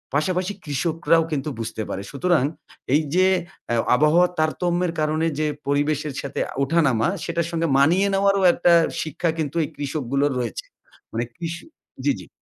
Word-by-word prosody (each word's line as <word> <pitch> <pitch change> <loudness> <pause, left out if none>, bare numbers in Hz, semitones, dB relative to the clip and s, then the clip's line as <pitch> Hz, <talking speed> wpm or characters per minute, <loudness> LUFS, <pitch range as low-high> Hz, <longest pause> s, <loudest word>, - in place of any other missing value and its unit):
পাশাপাশি 185 +6 0
কৃষকরাও 165 +3 +1
কিন্তু 150 0 -2
বুঝতে 115 -1 -4
পারে। 95 - -3
সুতরাং, 155 0 +2 0.5
এই 155 - +5
যে 185 0 +5 0.5
এ - - +2 0.2
আবহাওয়ার 155 +6 +4
তারতম্যের 175 +2 0
কারণে 155 +1 +1
যে 155 - +1 0.2
পরিবেশের 145 +1 0
সাথে 140 - -5 0.2
ওঠা 165 +4 +1
নামা। 115 -1 +2 0.2
সেটার 170 0 -1
সঙ্গে 165 0 0
মানিয়ে 175 +8 +4
নেওয়ারও 195 0 +3
একটা 175 0 +3 0.3
শিক্ষা 160 +2 -2
কিন্তু 150 -1 -2
এই - - -4
কৃষকগুলোর 140 -1 -1
রয়েছে। - - -4 0.5
মানে 115 +1 -1
কৃষি 170 0 -5 0.4
জি, - - +4
জি। - - -11
155 Hz, 150 wpm, -23 LUFS, 145-175 Hz, 0.5 s, এই